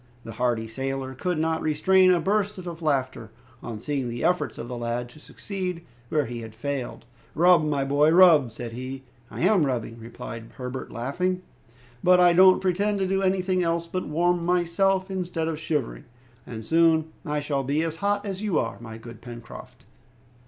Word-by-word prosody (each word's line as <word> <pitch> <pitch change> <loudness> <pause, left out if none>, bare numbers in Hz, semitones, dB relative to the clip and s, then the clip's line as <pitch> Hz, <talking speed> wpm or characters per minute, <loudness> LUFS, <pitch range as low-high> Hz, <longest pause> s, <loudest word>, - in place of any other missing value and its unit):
The 115 - -8
hardy 115 -1 -1
sailor 135 +3 -4
could 175 +6 -2
not 160 +1 0
restrain 185 +5 +4
a 180 -1 +4
burst 205 +3 0
of 175 -2 -7
laughter 130 -7 -1 0.3
on 115 -2 -6
seeing 135 0 -2
the 120 0 -5
efforts 180 0 0
of 120 - -6
the 125 - -5
lad 120 +1 -3
to 140 - -15
succeed 180 0 -6 0.2
where 150 -2 +1
he 120 0 -6
had 110 -1 -10
failed. 135 0 -4 0.3
"Rub, 175 0 +5
my 145 -2 0
boy, 145 +3 +3
rub!" 165 -6 +6
said 115 +1 -7
he. 130 +2 -6 0.3
"I - - -7
am 185 -1 +4
rubbing," 120 -4 -2
replied 115 0 -9
Herbert, 130 0 -6
laughing, 180 +10 -2 0.6
"but 180 0 +6
I 175 -1 +6
don't 185 +1 +6
pretend 200 +3 +1
to 190 -1 0
do 195 +1 0
anything 185 -1 +1
else 170 -1 0
but 185 +2 -4
warm 175 +3 +1
myself 185 +2 +1
instead 175 -3 -2
of 160 -2 -3
shivering, 150 -6 -3 0.4
and 110 -2 -7
soon 160 +1 +3
I 150 0 -2
shall 145 -2 -2
be 145 +4 0
as 165 -1 -3
hot 205 +3 0
as 195 -1 -4
you 205 -6 0
are, 115 - -2
my 110 -1 -9
good 115 0 -12
Pencroft!" 120 -1 -11
155 Hz, 180 wpm, -25 LUFS, 125-180 Hz, 0.6 s, rub